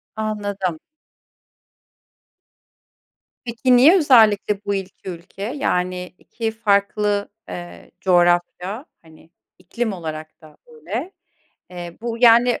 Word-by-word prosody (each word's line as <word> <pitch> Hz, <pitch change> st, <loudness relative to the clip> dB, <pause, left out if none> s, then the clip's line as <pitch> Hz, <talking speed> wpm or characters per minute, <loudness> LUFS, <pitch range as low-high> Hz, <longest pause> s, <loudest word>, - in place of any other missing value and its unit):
Anladım. 205 Hz, -6 st, -3 dB, 2.7 s
Peki, 235 Hz, +2 st, +2 dB
niye 310 Hz, +10 st, +7 dB
özellikle 220 Hz, -, +4 dB
bu 200 Hz, -, 0 dB
2 190 Hz, 0 st, -7 dB
ülke? 180 Hz, +3 st, -10 dB
Yani, 180 Hz, -8 st, -2 dB
2 225 Hz, -1 st, -4 dB
farklı, 205 Hz, -1 st, 0 dB, 0.2 s
eee, 175 Hz, 0 st, -9 dB
coğrafya, 180 Hz, -, +1 dB, 0.2 s
hani, 160 Hz, 0 st, -19 dB, 0.3 s
iklim 220 Hz, +4 st, -3 dB
olarak 155 Hz, -3 st, -7 dB
da 155 Hz, -1 st, -17 dB
öyle. 185 Hz, -, -6 dB, 0.6 s
Eee, 175 Hz, -1 st, -8 dB
bu, 230 Hz, 0 st, -4 dB
yani, 240 Hz, 0 st, +5 dB
200 Hz, 95 wpm, -21 LUFS, 175-230 Hz, 2.7 s, niye